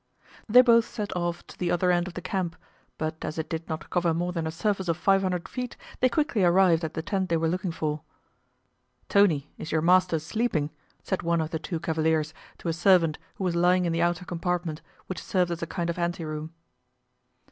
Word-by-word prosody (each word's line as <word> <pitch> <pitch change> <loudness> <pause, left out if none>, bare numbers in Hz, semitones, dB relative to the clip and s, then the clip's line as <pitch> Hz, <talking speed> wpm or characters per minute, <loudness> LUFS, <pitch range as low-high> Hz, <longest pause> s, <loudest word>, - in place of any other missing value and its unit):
They 250 +4 +8
both 230 -2 +5
set 210 -5 -5
off 175 -1 -2
to - - -13
the 180 - -2
other 180 +1 +2
end 175 0 +1
of 175 - -8
the 180 - -6
camp, 180 -3 -2 0.4
but 160 0 -4
as 155 - -4
it 160 - -2
did 165 +1 -4
not 160 0 -5
cover 175 -2 +2
more 175 +2 -1
than 165 -2 -2
a - - -2
surface 190 +2 -1
of 165 -2 +1
five 195 +2 +3
hundred 180 -2 -1
feet 250 -1 -5 0.2
they 255 - +4
quickly 270 - +1
arrived 175 -1 +4
at 160 0 -4
the 160 - -3
tent 190 +2 -1
they 165 - +2
were 165 0 +1
looking 180 +2 -1
for. 155 -2 -2 1.1
"Tony, 165 -8 +3
is 155 - -6
your 160 -1 +1
master 180 -1 +4
sleeping?" 160 -2 -1 0.3
said 190 - -2
one 170 0 +1
of 160 0 -2
the 160 - -2
two 160 +2 -4
cavaliers 160 -1 0 0.2
to - - -7
a 165 - +1
servant 170 -2 +4 0.2
who - - -5
was 180 -2 0
lying 180 +1 +3
in 170 - 0
the 165 - 0
outer 175 +1 +1
compartment, 175 -2 -2 0.2
which 185 - -5
served 180 -2 +1
as 170 - -3
a 165 - -2
kind 170 0 -3
of 170 +1 -2
ante 170 -1 -1
room. 155 +1 -5
175 Hz, 220 wpm, -27 LUFS, 160-185 Hz, 1.1 s, They